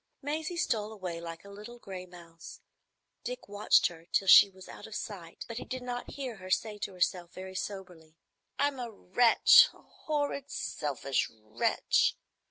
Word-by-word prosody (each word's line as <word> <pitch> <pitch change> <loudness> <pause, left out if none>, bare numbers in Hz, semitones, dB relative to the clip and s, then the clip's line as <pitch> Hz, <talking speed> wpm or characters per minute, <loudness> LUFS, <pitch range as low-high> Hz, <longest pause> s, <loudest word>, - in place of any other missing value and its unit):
Maisie 310 +4 -3
stole 215 -9 0
away 180 -5 -6
like 165 +1 -8
a - - -11
little 210 +4 -10
gray 185 -5 -8
mouse. 170 -2 -12 0.6
Dick - - -6
watched 205 +1 +3
her 165 -1 -3
till 195 - +1
she 200 - +9
was 190 -1 -14
out - - -10
of 220 - -9
sight, 175 -7 -7
but 230 - -6
he - - -6
did 255 -1 -6
not 245 0 -5
hear 260 -5 -5
her 185 -1 -10
say 210 +2 0
to 200 - -4
herself, 180 -1 -1
very 185 0 -8
soberly, 185 -5 -7 0.4
"I'm 285 -2 0
a 240 -1 -4
wretch,—a 225 +3 +5 0.3
horrid, 290 -2 -1
selfish 140 - -2
wretch. 110 -1 0
200 Hz, 165 wpm, -30 LUFS, 175-240 Hz, 0.6 s, she